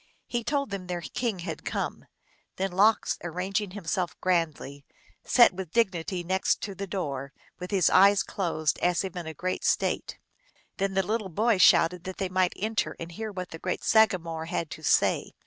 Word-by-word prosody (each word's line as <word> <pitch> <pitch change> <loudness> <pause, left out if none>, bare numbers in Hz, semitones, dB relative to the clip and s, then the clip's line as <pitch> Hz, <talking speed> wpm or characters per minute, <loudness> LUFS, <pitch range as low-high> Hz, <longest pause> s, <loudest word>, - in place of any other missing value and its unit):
He 240 -1 -3
told 280 -2 -1
them 190 -2 -5
their 175 -1 -3
king 225 +4 -2
had - - -5
come. - - -3 0.5
Then 195 0 -2
Lox, 205 +5 +3
arraying 180 +3 -4
himself 195 -3 -2
grandly, 155 -6 -1 0.4
sat 240 -5 +6
with 180 -3 -7
dignity 185 -5 0
next 185 +2 +1
the 200 -1 -6
door, 140 -8 -4 0.3
with 180 0 -6
his 195 -4 +3
eyes 200 +1 +6
closed, 160 -5 -1
as 175 +1 +1
if 190 -2 -6
in 170 -3 -5
great 185 +4 -3
state. - - 0 0.6
Then 195 -1 -1
the 195 -1 +2
little 215 0 -2
boy 215 +4 +1
shouted 175 0 +5
that 190 0 -6
they 190 -2 -2
might 185 -1 +1
enter 215 +1 -2
and 170 0 -7
hear 220 +5 -5
what 185 -2 -6
the 165 - -8
great 180 - -3
sagamore 170 -7 +2
had 165 -1 -3
to - - -8
say. - - +2
185 Hz, 175 wpm, -27 LUFS, 170-200 Hz, 0.6 s, sat